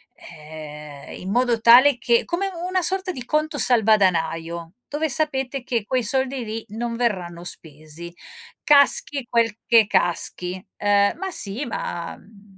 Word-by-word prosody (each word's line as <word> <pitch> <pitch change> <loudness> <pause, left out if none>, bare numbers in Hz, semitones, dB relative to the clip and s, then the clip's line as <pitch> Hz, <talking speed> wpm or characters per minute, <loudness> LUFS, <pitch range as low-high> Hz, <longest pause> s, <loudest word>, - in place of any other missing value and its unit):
ehm, 150 -2 -11
in 185 - -7
modo 240 -1 +1
tale 245 +3 +7
che 235 -1 +2
come 390 +3 -2 0.2
una 370 0 0
sorta 375 +2 -1
di 255 -7 -7
conto 305 0 -1
salvadanaio 170 -7 +1 0.2
dove 310 +2 -1
sapete 270 -1 -2
che 230 -5 -2
quei 255 -1 0
soldi 265 +2 -1
lì 225 +1 -6
non 230 +2 -4
verranno 180 -8 -2
spesi. 155 0 -10 0.5
Caschi 280 -2 +3
quel 230 -3 +1
che 230 -3 +6
caschi. 180 0 -1 0.3
Uhm, 200 0 +3
ma 385 +1 -4
sì, 220 - -4
ma 170 -6 -5
mhmm 200 -2 -20
225 Hz, 140 wpm, -22 LUFS, 175-265 Hz, 0.5 s, tale